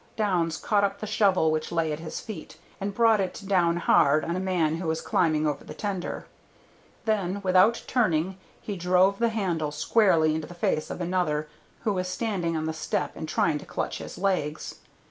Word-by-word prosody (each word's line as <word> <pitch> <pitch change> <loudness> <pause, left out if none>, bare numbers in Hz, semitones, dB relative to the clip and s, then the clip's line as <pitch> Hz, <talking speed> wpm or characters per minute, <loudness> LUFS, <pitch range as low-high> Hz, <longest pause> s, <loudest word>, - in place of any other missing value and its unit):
Downs 175 -7 0
caught 205 +3 +1
up 200 0 0
the - - -4
shovel 200 -6 +3
which 155 0 -2
lay 165 -2 0
at 150 - -5
his 160 0 -6
feet, 215 -3 -9 0.2
and 195 +1 -2
brought 225 -2 +4
it 190 +2 -4
down 175 -3 +2
hard 155 -3 +4
on 170 - -2
a - - -1
man 175 -4 0
who 170 0 -4
was 160 0 0
climbing 155 -3 +1
over 145 -2 -1
the - - -10
tender; 195 -4 -4 0.8
then 200 -3 0
without 185 +5 +4
turning 190 -6 +1 0.2
he 205 - -5
drove 185 +2 +3
the 235 0 +3
handle 180 -9 -1
squarely 160 -1 +3
into 155 -1 -3
the 175 - -11
face 155 -2 -1
of - - -5
another 170 -4 0 0.3
who 215 -3 0
was 185 -1 -2
standing 185 -5 -2
on 155 - -2
the 160 - -2
step 160 -1 -2
and 160 - -6
trying 150 -3 +1
to - - -11
clutch - - -3
his - - -8
legs. 180 -6 -2
180 Hz, 195 wpm, -26 LUFS, 160-200 Hz, 0.8 s, brought